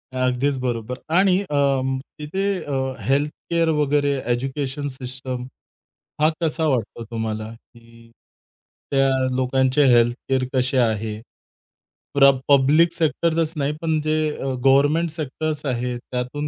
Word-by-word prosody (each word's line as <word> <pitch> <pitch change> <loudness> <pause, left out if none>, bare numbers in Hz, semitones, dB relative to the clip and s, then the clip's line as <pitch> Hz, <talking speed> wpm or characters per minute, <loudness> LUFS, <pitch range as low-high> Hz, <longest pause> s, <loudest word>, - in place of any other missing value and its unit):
अगदीच 130 +2 +1
बरोबर 125 -1 -3 0.2
आणि 190 0 +4
अं, 140 -6 0 0.2
तिथे 160 +7 -3 0.2
अ, 135 -2 -2
हेल्थ 140 +3 +2 0.2
केअर 170 -1 +2
वगैरे, 145 -1 +2 0.2
एज्युकेशन 135 +3 -2
सिस्टम 130 -1 -6 0.8
हा 155 - +5
कसा 160 0 0
वाटतो 120 -4 -1
तुम्हाला? 110 -1 -3
की 115 0 -19 0.8
त्या 135 -1 +3 0.3
लोकांचे 130 +2 +2
हेल्थ 120 0 +4
केअर 130 -1 +2
कसे 130 0 +1
आहे? 110 -3 0 0.9
प्र 140 -1 +7 0.2
पब्लिक 145 +5 +5
सेक्टरचंच 165 0 0
नाही 145 +1 0
पण 160 -2 +1
जे 155 +1 0 0.2
अ, - - -6 0.2
गव्हर्नमेंट 145 +5 +4
सेक्टर्स 155 0 -4
आहेत. 125 -2 -2
त्यातून 125 +4 -3
135 Hz, 120 wpm, -22 LUFS, 125-150 Hz, 0.9 s, प्र